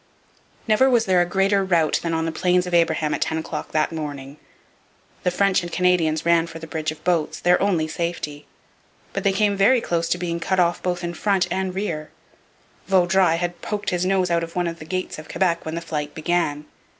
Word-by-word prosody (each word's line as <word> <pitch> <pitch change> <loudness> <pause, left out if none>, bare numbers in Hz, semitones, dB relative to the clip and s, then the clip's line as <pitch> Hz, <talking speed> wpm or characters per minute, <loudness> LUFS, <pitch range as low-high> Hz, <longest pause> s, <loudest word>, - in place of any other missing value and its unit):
Never 225 +5 +4
was 235 -3 +3
there 185 -2 +3
a 175 - +1
greater 195 +2 +2
rout 170 -5 +2
than 170 - -2
on 160 0 0
the 165 - -1
Plains 180 +2 +1
of 180 - -6
Abraham 160 -3 +2
at - - -3
ten 160 - 0
o'clock 160 - -5
that 155 +1 +1
morning. 145 -3 -6 0.8
The - - +1
French 190 +1 +2
and 175 -1 -7
Canadians 170 -4 +1
ran 170 0 +3
for 165 - -9
the 165 - -8
bridge 155 0 -3
of 155 - -12
boats, 170 -3 0
their 175 0 +3
only 180 -6 +1
safety. 155 -3 -4 0.7
But - - -3
they 200 - +3
came 205 +1 +1
very 215 +6 +4
close 170 -6 -1
to 180 - +1
being 170 -1 -3
cut 190 +2 0
off 175 -1 +2
both 180 -1 -2
in 175 0 -3
front 190 0 +1
and 190 0 -2
rear. 165 -6 -3 0.8
Vaudreuil 185 -2 +3
had 175 0 -3
poked 205 -1 -3
his 180 0 0
nose 185 -1 +1
out 170 0 +2
of 165 0 -7
one 180 -1 0
of 170 0 -4
the 155 - -9
gates 185 -1 -4
of 155 - -11
Quebec 170 -3 0
when 160 +1 -4
the 170 - -3
flight 150 -2 -4
began. 155 -2 -1
175 Hz, 215 wpm, -22 LUFS, 160-185 Hz, 0.8 s, Never